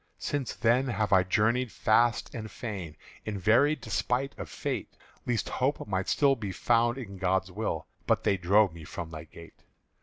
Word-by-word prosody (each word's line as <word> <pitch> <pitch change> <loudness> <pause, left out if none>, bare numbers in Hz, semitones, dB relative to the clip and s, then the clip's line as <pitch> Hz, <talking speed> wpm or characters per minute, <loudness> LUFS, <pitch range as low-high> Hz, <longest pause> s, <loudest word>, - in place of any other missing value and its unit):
"Since 145 -4 -3
then 120 +4 +2
have 110 -4 0
I 95 - +7
journeyed 110 +6 +1
fast 115 +1 +2
and 110 -2 -6
fain 95 - -6 0.3
In 105 -2 -4
very 120 - +4
despite 135 -1 -1
of - - -6
Fate, - - -4 0.3
Lest 120 -4 0
Hope 135 0 -1
might 95 -1 -1
still 140 -2 +4
be 105 -5 -5
found 120 +5 +2
in 100 -7 -8
God's 95 0 +1
will: 110 +4 -3 0.2
But - - +2
they 100 - +3
drove 95 +1 +3
me 85 -1 -10
from 80 +1 -7
thy 80 0 -7
gate. 85 +1 -14
110 Hz, 175 wpm, -29 LUFS, 95-120 Hz, 0.3 s, I